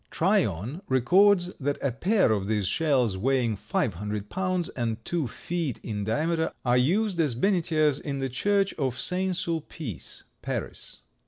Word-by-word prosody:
Tryon 160 - 0
records 180 +8 +4
that 145 0 -1
a 140 - 0
pair 190 - +2
of 100 -3 0
these 105 -2 0
shells, 130 - +1
weighing 120 0 +1
five 140 - -1
hundred 105 +3 -5
pounds, 185 -2 -1
and 115 -3 -2
two 165 -6 -1
feet 160 +2 -4
in 105 -2 -3
diameter, 160 +8 0
are 120 0 +3
used 185 - +1
as 150 -7 +2
benetiers 155 - +2
in 140 -1 -4
the 135 0 -1
church 195 +9 +1
of 130 -3 -1
St. 185 +3 0
Sulpice, 160 - -5 0.2
Paris. - - -5
145 Hz, 150 wpm, -27 LUFS, 115-175 Hz, 0.2 s, records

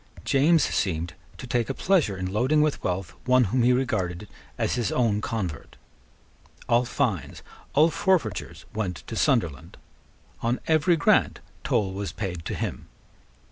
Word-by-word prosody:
James 150 +3 +4
seemed 85 -5 -1 0.2
to - - -8
take 120 -1 -1
a 135 - -2
pleasure 165 - +2
in 95 0 -4
loading 130 +8 +3
with 155 -1 -1
wealth 90 -1 -2
one 130 0 +5
whom 120 +4 +1
he 120 +1 +4
regarded 105 -7 -1 0.3
as - - 0
his 120 -5 -1
own 110 -4 +1
convert. 95 -10 -4 0.9
All 120 +1 +3
fines, 120 - -2 0.3
all 155 +4 +5
forfeitures 165 - -1
went 95 -5 -3
to 115 - -6
Sunderland. 110 - 0 0.6
On 120 +2 0
every 160 +2 +3
grant 145 - +3 0.2
toll 95 -2 0
was 100 0 -4
paid 90 -5 -5
to - - -3
him. - - -4
115 Hz, 145 wpm, -25 LUFS, 95-135 Hz, 0.9 s, one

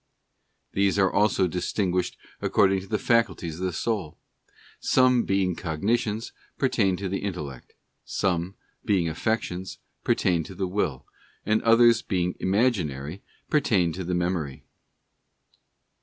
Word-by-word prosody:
These 100 0 +2
are 95 -2 +3
also 105 -2 +3
distinguished 90 +1 -1 0.2
according 95 -1 +3
to 95 - -10
the 105 - 0
faculties 110 -10 0
of 95 - -2
the - - -2
soul. 95 -4 -2 0.6
Some, 125 -2 +3
being 95 -2 +1
cognitions, 105 +8 -1 0.3
pertain 100 -8 +2
to 100 - -3
the 95 +1 -2
Intellect; 75 -10 -6 0.3
some, 90 0 -1 0.3
being 95 -5 +2
affections, 90 +1 -2 0.3
pertain 85 -3 +2
to 95 - -10
the 95 - -1
Will; 90 -8 -2 0.4
and 110 +1 +2
others, 115 0 +5
being 90 -2 -1
imaginary, 95 - 0 0.3
pertain 100 - +2
to 95 - -5
the 90 +1 -2
Memory. 85 -6 -2
95 Hz, 125 wpm, -26 LUFS, 90-105 Hz, 0.6 s, others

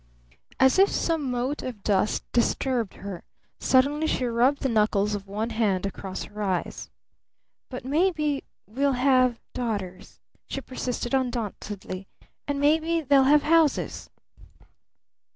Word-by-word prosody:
As 265 +7 +5
if 390 - +6
some 320 -5 -1
mote 250 +4 -2
of 240 -6 -7
dust 205 0 +1
disturbed 240 -2 0
her, 195 -3 -7 0.4
suddenly 285 +4 +3
she 255 - 0
rubbed 245 +4 +2
the - - +2
knuckles 210 -2 +2
of 200 -1 -5
one 215 +4 -3
hand 210 -4 0
across 195 -1 -5
her 210 0 -8
eyes. 185 -4 -2 0.8
"But - - -7
maybe 300 -1 +1 0.2
we'll 270 +6 0
have 255 -2 +3
daughters," 205 -7 -4 0.3
she - - -4
persisted 255 -2 -4
undauntedly. 210 -6 -3 0.4
"And 285 -1 -1
maybe 320 +3 +2
they'll 275 -2 +4
have 295 +2 +5
houses!" 320 -2 +2
250 Hz, 125 wpm, -26 LUFS, 210-280 Hz, 0.8 s, if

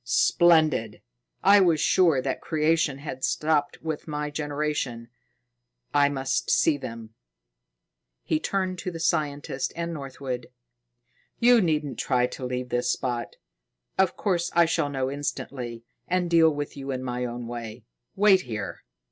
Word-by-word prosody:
"Splendid! 155 -5 +3 0.4
I 200 +1 +7
was 170 -5 +4
sure 160 -5 +3
that 135 - -2
creation 155 -3 +1
had 140 -2 -7
stopped 150 -2 0
with 160 -1 -4
my 150 -1 -3
generation. 145 -5 -3 0.8
I 145 -1 +4
must 135 -1 -1
see 160 - +4
them." 115 -4 -8 1.1
He 155 - 0
turned 185 0 -2
to - - -3
the 165 -2 -7
scientist 145 -5 -1
and 170 0 -3
Northwood. 135 -4 -5 0.9
"You 240 -1 +5
needn't 150 - -1
try 125 -2 +2
to 125 - -7
leave 125 0 -3
this 120 0 0
spot. 120 -2 -3 0.6
Of 190 -1 +2
course 175 -4 0
I 170 0 +6
shall 145 -3 0
know 135 -1 -2
instantly 125 -4 -5 0.2
and 180 -1 0
deal 165 -1 +6
with 145 -1 -4
you 140 -1 -7
in 130 -1 -3
my 125 -1 -3
own 120 0 -5
way. 115 -1 -7 0.3
Wait 195 -1 +5
here." 105 - -6
145 Hz, 140 wpm, -26 LUFS, 125-165 Hz, 1.1 s, I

